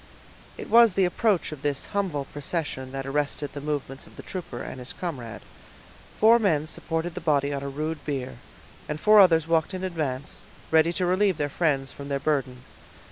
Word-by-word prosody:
It - - -7
was 230 -4 +6
the 195 - +4
approach 190 0 +1
of 150 -3 -8
this 145 -2 -1
humble 180 -9 -1
procession 145 -3 -4
that 135 0 -4
arrested 145 +1 -2
the 145 - -6
movements 145 -2 -4
of - - -17
the - - -10
trooper 170 -10 -6
and 130 - -7
his 125 +1 -6
comrade. 125 -11 -6 0.8
Four 230 +2 +7
men 160 -8 +1
supported 165 +1 -3
the 180 - -6
body 145 -3 +1
on 140 - -3
a 140 - -4
rude 155 +3 -4
bier; 135 - -4 0.5
and 150 0 -3
four 215 +3 +6
others 165 -5 +6
walked 165 +2 +1
in 185 - -5
advance, 150 -7 -3 0.3
ready 160 +1 +5
to 180 - -1
relieve 185 +1 +2
their 145 0 -1
friends 140 -4 0
from 140 - -9
their 140 -1 -1
burden. 135 -4 -1
150 Hz, 190 wpm, -26 LUFS, 140-180 Hz, 0.8 s, Four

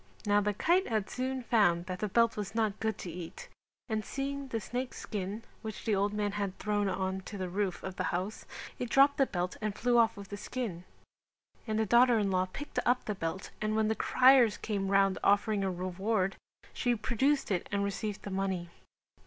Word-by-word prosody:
Now 205 0 +4
the 205 0 0
kite 355 - +2
had 215 -4 -1
soon 260 0 -2
found 200 -7 +3
that 180 -1 -5
the 210 - -1
belt 230 +3 +3
was 210 0 -5
not 220 -3 0
good 220 0 -1
to 175 - -6
eat 180 - -8 0.4
and 220 -2 -1
seeing 275 +2 -4
the 230 -3 -2
snake's 245 +4 -4
skin 205 +1 -4 0.2
which 220 -2 -7
the 220 - +2
old 200 +1 +1
man 210 -1 -1
had 200 -2 -3
thrown 205 -1 0
on 190 0 -2
to 205 - -7
the 185 -1 -3
roof 190 -2 -2
of 190 -1 -6
the - - -1
house, 185 +5 -3 0.3
it 245 - -3
dropped 275 +3 +5
the 270 - +3
belt 180 -1 -3
and 210 -1 -2
flew 245 0 +3
off 225 -2 +3
with 200 -1 -9
the 205 - -5
skin; 205 -6 -4 0.8
and 215 0 0
the 220 - +2
daughter 240 +2 +5
in 200 -2 +1
law 185 0 +1
picked 290 +7 -4
up 245 +1 +2
the 210 - -1
belt 185 0 -4
and 215 0 0
when 220 0 +2
criers 250 -1 +5
came 200 -3 -2
round 195 -1 +3
offering 205 0 +3
a 190 - +1
reward 185 +2 -1 0.4
she 245 -1 +1
produced 260 +5 +1
it 180 - -1
and 200 -1 +1
received 200 0 -3
the 200 - -6
money. 190 -3 -2
210 Hz, 205 wpm, -31 LUFS, 195-230 Hz, 0.8 s, dropped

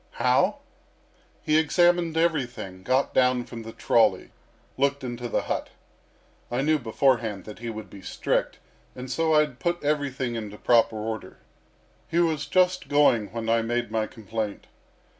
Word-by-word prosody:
"How? - - +2 0.9
He 155 +1 +3
examined 175 +1 +2
everything, 125 - -1
got 130 +7 +1
down 125 -1 +3
from 120 -1 -9
the 115 0 -8
trolley, - - +2 0.4
looked 140 +1 0
into 120 -1 -5
the - - 0
hut. - - -3 0.8
I 125 +3 -1
knew 155 +1 +2
beforehand 115 -4 0
that 105 - -10
he 120 0 -5
would 110 -2 -7
be 95 +1 -12
strict, - - -1 0.4
and 125 0 -7
so 160 +4 +2
I 150 - +7
had 150 -5 -3
put 175 -1 -1
everything 140 -4 -1
into 105 -3 -6
proper 115 -1 +3
order. 110 +1 -5 0.7
He 170 - -2
was 160 -4 +1
just 180 +2 +2
going 135 -8 +3
when 115 -1 -4
I 115 0 +3
made 120 +1 -2
my 110 -1 0
complaint. 110 -1 -5
125 Hz, 155 wpm, -26 LUFS, 115-150 Hz, 0.9 s, I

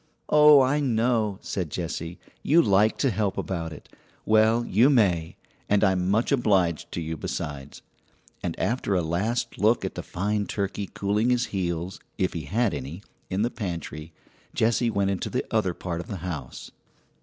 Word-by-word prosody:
"Oh, 150 -1 +8
I 135 +3 +2
know!" 115 -5 +1
said 90 -5 -3
Jessie; 85 +1 -4 0.2
"you 160 +4 +4
like 105 +1 +3
to 135 - +1
help 100 -1 -1
about 85 -3 -3
it. 80 - -11 0.4
Well, 110 +2 +4
you 115 +8 +4
may; 90 - +2 0.3
and 105 0 +3
I'm 95 -2 +2
much 110 +7 +1
obliged 95 - +1
to 85 - -3
you, 80 0 -4
besides." 70 -2 -6 0.6
And - - -4
after 115 -4 0
a 90 - +1
last 110 +9 -2
look 110 +4 +3
at - - -4
the - - -5
fine 105 +2 -2
turkey 100 -1 -3
cooling 105 +4 +1
his 125 0 +2
heels 90 -1 -2 0.2
(if 95 -2 0
he 80 -4 -5
had 110 +4 0
any) 75 +7 -6 0.3
in 95 +2 0
the 120 - 0
pantry, 85 -7 -6 0.4
Jessie 115 +1 +2
went 100 -2 0
into 95 - -3
the - - -2
other 90 -2 +1
part 85 -2 -4
of - - -12
the 105 -5 -5
house. 75 -8 -6
100 Hz, 170 wpm, -26 LUFS, 85-115 Hz, 0.6 s, Oh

